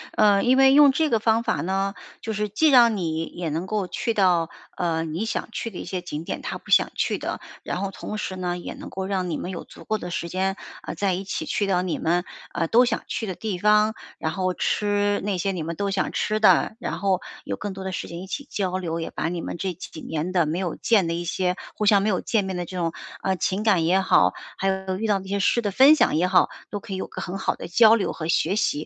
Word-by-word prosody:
呃， 205 -2 +4
因 255 +2 +4
为 270 0 +7
用 290 -1 +8
这 310 +3 +1
个 225 - +3
方 225 +1 +2
法 225 - 0
呢， 195 +2 -1 0.3
就 220 - -4
是 210 0 -2
既 310 +10 +3
让 235 -5 +6
你 165 -3 -2
也 170 -1 -5
能 165 +5 -3
够 205 -3 -1
去 230 +6 -2
到， 175 -4 +3 0.3
呃， 165 -2 0
你 165 +5 -3
想 225 - -3
去 230 - -4
的 190 - -10
一 - - -6
些 185 -2 -3
景 160 -3 -5
点 - - -5
她 - - -4
不 - - -13
想 - - +5
去 - - 0
的。 - - -4 0.2
然 - - -3
后 195 0 -2
同 215 +2 -6
时 190 - -4
呢， 180 -1 -2
也 175 - -6
能 - - -9
够 190 0 -4
让 190 -2 -1
你 165 - -2
们 180 - -5
有 180 - -6
足 - - -14
够 215 -1 -1
的 175 - -6
时 170 -1 -3
间， 190 +2 0 0.3
呃， - - -6
再 195 -2 +1
一 185 +2 -3
起 195 - -4
去 205 - -1
到 180 -2 +1
你 180 -3 -2
们， 175 +2 +1 0.3
呃， 165 - 0
都 240 +6 +5
想 235 -2 -1
去 225 - -3
的 185 - -4
地 205 -3 -4
方， 210 +2 +4 0.2
然 160 - -2
后 185 +1 -1
吃 205 0 +1
那 200 -2 -1
些 195 +3 0
你 180 -4 -4
们 165 +2 -4
都 200 +3 -1
想 195 - 0
吃 215 0 0
的， 215 0 +4
然 - - -3
后 190 -2 +1 0.2
有 - - -3
更 205 -1 -5
多 190 0 -7
的 190 - -3
时 185 - -4
间 170 +1 -7
一 - - -7
起 280 +8 -5
交 185 -2 -1
流， 165 -2 -3
也 165 - -4
把 160 - -2
你 175 -1 -3
们 - - -5
这 185 +1 -2
几 155 -1 -9
年 160 +3 -3
的 175 -4 +2
没 155 +3 -1
有 180 -3 -2
见 210 -6 +3
的 165 - -1
一 170 +1 -3
些 180 +1 0 0.2
互 210 - -1
相 200 -1 +5
没 210 - +1
有 185 -4 +1
见 215 -4 0
面 190 -1 -3
的 175 - -3
这 185 +2 -7
种， 165 -2 -1 0.3
呃， 190 - 0
情 190 +3 -1
感 195 -7 +3
也 185 +3 +4
好， 190 - +4 0.2
还 195 - -1
有 190 -1 -2
遇 225 - -3
到 205 -2 +2
这 190 - -11
些 200 +1 -1
事 235 +5 +2
的 210 - -1
分 265 +9 +7
享 300 - +3
也 170 - +3
好， 185 0 +4 0.2
都 205 - -3
可 210 -3 -8
以 - - -2
有 - - -3
个 - - -7
很 185 +2 -4
好 - - -1
的 - - -7
交 220 +5 +6
流 215 -4 +1
和 160 -1 -5
学 170 +3 +2
习。 215 - +2
190 Hz, 295 characters per minute, -24 LUFS, 175-210 Hz, 0.3 s, 用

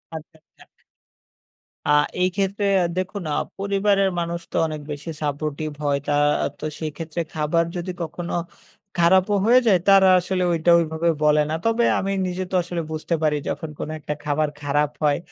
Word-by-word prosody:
আচ্ছা, 160 +1 -10
আচ্ছা। - - -22 1.2
আ - - -2 0.3
এই 185 - +3
ক্ষেত্রে 200 +1 -1 0.2
আ - - +2
দেখুন 185 +1 -3
আ - - 0 0.2
পরিবারের 200 0 +2
মানুষ 170 0 -2
তো - - -2
অনেক 155 -1 -5
বেশি 150 +3 -6
supportive 150 +1 -3
হয়। 145 -1 +2
তা 145 - +1 0.5
তো - - -5
সেইক্ষেত্রে 160 +1 -4
খাবার 160 +2 +1
যদি 175 +1 -3
কখনো 170 +1 -5 0.6
খারাপও 185 +4 +4
হয়ে 245 +3 +6
যায় 190 -5 +5
তারা 195 -1 +7
আসলে 185 +1 -1
ঐটা 165 +1 +2
ওইভাবে 160 +1 0
বলে 150 0 +4
না। 155 - -1
তবে 230 +1 +2
আমি 195 0 -2 0.2
নিজে 180 +1 -3
তো - - -1
আসলে 175 -1 -3
বুঝতে 155 +2 -2
পারি 150 -1 +2
যখন 160 - -4
কোন - - -4
একটা 150 - -4
খাবার 150 +1 0
খারাপ 145 0 +1
হয়। 145 -1 +3
170 Hz, 170 wpm, -23 LUFS, 150-190 Hz, 1.2 s, তারা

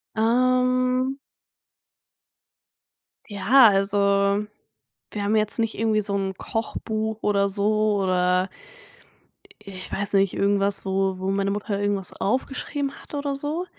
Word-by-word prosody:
Ähm 255 +3 +2 2.1
ja, 225 +4 +5
also 200 0 +2 0.7
wir 205 - -4
haben 205 +2 +1
jetzt 215 +1 0
nicht 225 -1 0
irgendwie 220 -1 +2
so 200 -1 -3
'n 195 -1 -2
Kochbuch 220 -1 -4
oder 200 -1 +2
so 210 +1 +1
oder, 180 0 +1 1.2
i 200 - -9
ich 185 -1 -9
weiß 205 +1 -3
nicht, 195 -1 +3
irgendwas, 200 0 0
wo 190 0 0
wo 190 +1 -2
meine 195 0 0
Mutter 205 0 -3
irgendwas 200 -2 -2
aufgeschrieben 275 +4 -2
hat - - -18
oder 285 -1 -2
so. 300 +6 -3
205 Hz, 120 wpm, -24 LUFS, 195-235 Hz, 2.1 s, ja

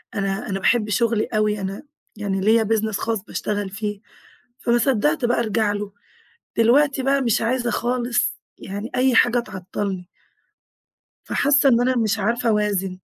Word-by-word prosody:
أنا 195 +2 -2
أنا 195 0 -2
باحب 215 +1 +2
شغلي 225 +1 +1
أوي، 215 -1 0
أنا 195 +7 -5 0.3
يعني 195 -2 -2
ليّا 220 +2 +4
business 220 0 0
خاص 225 -4 -2
باشتغل 205 -2 -3
فيه، 205 +1 -4 0.6
فما 240 0 +1
صدّقت 220 - +1
بقى 240 +1 +2
أرجع 215 -2 0
له. 205 -1 -5 0.7
دلوقتي 265 +4 +3
بقى 275 +1 +2
مش 235 -3 +1
عايزة 240 +1 0
خالص 245 0 0 0.2
يعني 205 +4 -6
أي 255 -1 +3
حاجة 240 +1 +4
تعطلني 190 -3 -5 1.2
فحاسة 280 0 +3
إن 235 -2 +4
أنا 255 +1 +1
مش 225 -1 +1
عارفة 235 +4 0
أوازن. 200 -3 0
220 Hz, 145 wpm, -22 LUFS, 200-240 Hz, 1.2 s, ليّا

